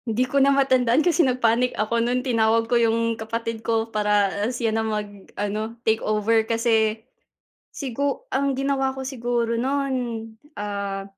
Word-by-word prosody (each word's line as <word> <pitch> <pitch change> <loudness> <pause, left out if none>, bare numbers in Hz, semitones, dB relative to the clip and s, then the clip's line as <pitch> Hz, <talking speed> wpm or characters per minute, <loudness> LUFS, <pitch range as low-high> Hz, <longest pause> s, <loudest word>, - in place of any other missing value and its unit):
Hindi 230 +3 +1
ko 275 +2 +1
na 275 - +5
matandaan 265 0 +3
kasi 345 -1 +3
nag-panic 250 -2 +2
ako 230 +2 0
nun 250 +2 0
tinawag 225 -2 +2
ko 230 - -3
'yung 230 -1 +2
kapatid 230 0 -4
ko 225 -1 0
para 210 -2 +2 0.2
siya 235 -3 -1
na 225 - +1
mag-ano 210 +1 -4
take 220 0 +2
over 215 +1 +2
kasi, 225 -1 +1 0.6
sigu 275 +1 -3
ang 275 0 0
ginawa 270 -1 0
ko 265 - -5
siguro 240 -3 -1
nun, 275 +2 -1 0.6
ah, 200 -1 -4
230 Hz, 145 wpm, -23 LUFS, 220-260 Hz, 0.6 s, na